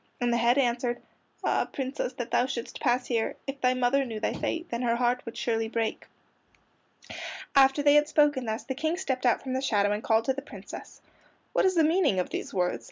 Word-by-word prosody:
And 240 Hz, -1 st, +1 dB
the -, -, +2 dB
head 235 Hz, +2 st, +3 dB
answered: 240 Hz, -2 st, +1 dB, 0.4 s
"Ah, -, -, +1 dB
Princess, 265 Hz, -1 st, -3 dB
that 240 Hz, -2 st, -6 dB
thou 250 Hz, -, +3 dB
shouldst 240 Hz, -2 st, -5 dB
pass 245 Hz, +1 st, +1 dB
here! 230 Hz, -3 st, -1 dB
If 275 Hz, 0 st, -6 dB
thy 255 Hz, 0 st, +3 dB
mother 255 Hz, +2 st, +2 dB
knew 225 Hz, -4 st, -5 dB
thy 215 Hz, -, -1 dB
fate, 335 Hz, +1 st, -3 dB
Then 235 Hz, 0 st, -2 dB
her 235 Hz, -2 st, +1 dB
heart 245 Hz, +1 st, +1 dB
would 230 Hz, -, -7 dB
surely 225 Hz, -1 st, 0 dB
break." 225 Hz, -1 st, -2 dB, 1.5 s
After 270 Hz, +1 st, +5 dB
they 290 Hz, 0 st, +6 dB
had 295 Hz, 0 st, +5 dB
spoken 295 Hz, -4 st, +2 dB
thus 220 Hz, +1 st, -3 dB
the 265 Hz, -, -4 dB
King 315 Hz, +5 st, -1 dB
stepped 265 Hz, -9 st, -1 dB
out 240 Hz, -, +2 dB
from 260 Hz, -1 st, -4 dB
the 260 Hz, -, 0 dB
shadow 205 Hz, -6 st, +2 dB
and 210 Hz, +1 st, -1 dB
called 225 Hz, 0 st, +2 dB
to 265 Hz, -, +2 dB
the 275 Hz, -, -5 dB
Princess. 285 Hz, -, -10 dB, 0.5 s
"What -, -, +3 dB
is 375 Hz, -1 st, +3 dB
the 325 Hz, -, +5 dB
meaning 310 Hz, -, +3 dB
of 180 Hz, -, -2 dB
these -, -, -4 dB
words?" 180 Hz, -9 st, 0 dB
250 Hz, 220 wpm, -28 LUFS, 235-275 Hz, 1.5 s, they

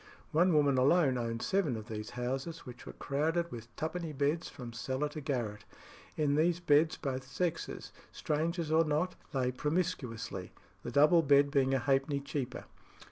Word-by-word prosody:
One 175 Hz, +4 st, +4 dB
woman 140 Hz, -3 st, +4 dB
alone 140 Hz, 0 st, +4 dB
owned 115 Hz, -1 st, -3 dB
seven 190 Hz, -10 st, +1 dB
of 110 Hz, 0 st, -8 dB
these 105 Hz, -2 st, -5 dB
houses, 135 Hz, +6 st, -4 dB
which 125 Hz, -1 st, -10 dB
were -, -, -7 dB
crowded 160 Hz, +5 st, -1 dB
with 115 Hz, -1 st, -7 dB
twopenny 160 Hz, 0 st, -3 dB
beds 145 Hz, +4 st, 0 dB
from 120 Hz, -5 st, -9 dB
cellar 130 Hz, +5 st, -2 dB
to 150 Hz, +1 st, -7 dB
garret. 115 Hz, -7 st, -3 dB, 0.5 s
In 150 Hz, -2 st, +2 dB
these 165 Hz, +3 st, +2 dB
beds 160 Hz, -1 st, +3 dB
both 130 Hz, -3 st, -3 dB
sexes, 175 Hz, +3 st, -3 dB, 0.2 s
strangers 160 Hz, +1 st, -1 dB
or 160 Hz, +1 st, +5 dB
not, 155 Hz, +4 st, 0 dB, 0.2 s
lay 130 Hz, -3 st, 0 dB
promiscuously, 125 Hz, -, -3 dB, 0.3 s
the -, -, -5 dB
double 150 Hz, +7 st, +5 dB
bed 140 Hz, -1 st, +4 dB
being 135 Hz, -2 st, +3 dB
a -, -, +4 dB
halfpenny 135 Hz, +2 st, +1 dB
cheaper. 140 Hz, -2 st, -4 dB
145 Hz, 160 wpm, -32 LUFS, 125-160 Hz, 0.5 s, or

